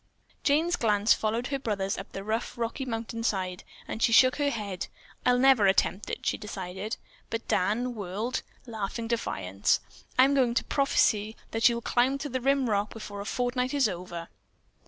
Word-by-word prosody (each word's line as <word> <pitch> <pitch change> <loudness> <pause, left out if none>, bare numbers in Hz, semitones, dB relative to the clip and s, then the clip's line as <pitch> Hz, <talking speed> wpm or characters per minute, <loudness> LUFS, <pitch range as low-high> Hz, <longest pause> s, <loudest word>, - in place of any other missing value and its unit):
Jane's 320 +5 +3
glance 210 -1 +4
followed 225 +3 -1
her 275 -1 -1
brother's 200 -6 -1
up 195 - -8
the 195 - -6
rough, 220 +4 -2
rocky 235 +3 -2
mountain 230 -1 -4
side 185 -4 -1 0.2
and 220 - -5
she 230 - +4
shook 255 +3 +6
her 290 -1 +2
head. 205 -7 -4 0.4
"I'll 250 0 +5
never 255 -5 +5
attempt 190 +1 +2
it," - - -5
she - - 0
decided, 195 0 -5 0.3
but 225 0 -4
Dan 225 +7 +1
whirled, 210 +4 -3 0.2
laughing 225 0 -4
defiance. 100 - 0 0.4
"I'm 265 +2 +6
going 250 -4 +2
to - - +2
prophesy 220 -6 +2 0.2
that 225 +2 +5
you'll 235 0 -2
climb 250 +4 +2
the 270 -3 -3
rim 270 0 +2
rock 205 -1 +1
before 205 -2 -7
a - - -6
fortnight 250 +3 -1
is 275 -4 +4
over." 175 -3 -6
225 Hz, 170 wpm, -28 LUFS, 200-250 Hz, 0.4 s, shook